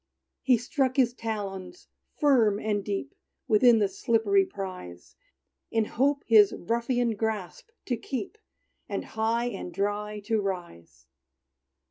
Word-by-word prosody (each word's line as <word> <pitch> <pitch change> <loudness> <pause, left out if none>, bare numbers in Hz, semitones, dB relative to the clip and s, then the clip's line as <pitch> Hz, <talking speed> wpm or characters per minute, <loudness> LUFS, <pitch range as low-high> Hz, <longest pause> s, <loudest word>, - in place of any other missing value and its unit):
He 255 -2 +4
struck 260 +2 -1
his 245 -3 +3
talons 210 - -6 0.3
firm 235 -9 +3
and 210 -2 -1
deep, 195 -10 -4 0.3
Within 235 +1 +6
the 210 -2 +3
slippery 200 -1 +2
prize, 180 - -8 0.5
In 225 -1 +1
hope 280 +6 0
his 215 -3 +6
ruffian 235 +3 0
grasp 215 - -4 0.2
to 245 - 0
keep, 260 - -5 0.5
And - - -3
high 225 +2 -1
and 195 -4 -6
dry 205 +3 -2
to 215 +1 0
rise. 85 - -6
215 Hz, 120 wpm, -27 LUFS, 195-235 Hz, 0.5 s, Within